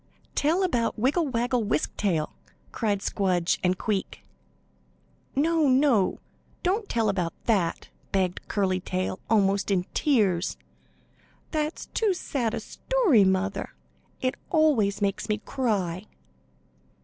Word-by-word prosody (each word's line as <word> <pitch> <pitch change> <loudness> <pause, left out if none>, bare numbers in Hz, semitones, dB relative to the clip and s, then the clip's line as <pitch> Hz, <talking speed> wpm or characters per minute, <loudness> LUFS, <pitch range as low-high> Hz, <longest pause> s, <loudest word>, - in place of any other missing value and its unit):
"Tell 330 +6 +2
about 240 -11 0
Wiggle 285 +8 +2
Waggle 245 -1 0
Wisk 155 -7 -1
Tail!" 170 -7 0 0.4
cried 205 -4 -1
Squdge 185 -4 +1
and 180 0 +2
Queek. 205 -1 -3 1.1
"No, 315 +2 +3
no; 255 -7 +3 0.5
don't 400 +4 0
tell 225 -2 +1
about 180 -5 -1
that," 190 -8 0 0.2
begged 185 -2 -1
Curly 190 -3 0
Tail, 185 0 -3
almost 200 -2 +2
in 190 -3 +2
tears. 205 - +1 0.9
"That's 310 0 -2
too 420 -4 0
sad 245 -9 -2
a - - -2
story, 425 - +2
mother. 190 +1 0 0.5
It 255 0 +1 0.2
always 255 - +2
makes 195 +2 -1
me 210 - +1
cry." 205 -6 -2
215 Hz, 115 wpm, -26 LUFS, 190-280 Hz, 1.1 s, No